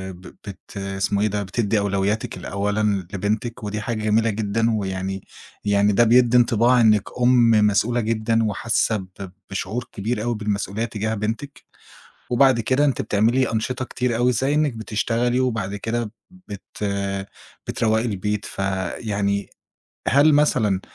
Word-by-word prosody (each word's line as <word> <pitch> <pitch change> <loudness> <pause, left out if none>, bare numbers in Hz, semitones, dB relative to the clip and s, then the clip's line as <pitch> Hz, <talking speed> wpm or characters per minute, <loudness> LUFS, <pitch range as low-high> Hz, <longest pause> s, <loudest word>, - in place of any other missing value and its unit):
ب 90 - -16
بت 100 0 -12
اسمه 100 +1 -1
إيه 110 - +3
ده؟ 105 0 -2
بتدّي 105 +2 0
أولوياتِك 100 +2 -1
لأولًا 100 -1 -1
لبنتِك، 110 +4 -2
ودي 105 0 -3
حاجة 110 0 -3
جميلة 110 +1 +2
جدًا، 110 +2 0
ويعني 95 -2 -3 0.4
يعني 100 0 +3
ده 120 - +5
بيدّي 120 +1 +5
انطباع 120 +1 +4
إنِك 105 -3 +4 0.2
أُم 120 -1 +5 0.2
مسؤولة 115 +4 +1
جدًا 115 0 0
وحاسة 110 +1 0
ب 95 -1 -9 0.2
بشعور 105 +5 -4
كبير 105 +2 -3
أوي 120 0 -1
بالمسؤولية 105 0 -2
تجاه 110 -1 -3
بنتِك. 115 +7 -5 0.6
وبعد 130 -1 +4
كده 130 +5 +2
أنتِ 140 - +1
بتعملي 115 +4 +1
أنشطة 125 +4 -2
كتير 125 -1 -2
أوي، 125 +2 +2
زي 135 +5 0
إنك 150 -2 +2
بتشتغلي، 115 +2 -1
وبعد 110 -6 -1
كده 115 +1 -3 0.2
بت 145 - -11 1.0
بتروّقي 110 0 +1
البيت، 105 -1 -2
فيعني 100 +1 -2 0.6
هل 145 +4 +5
مثلًا 110 -10 +2
110 Hz, 140 wpm, -22 LUFS, 100-120 Hz, 1.0 s, ده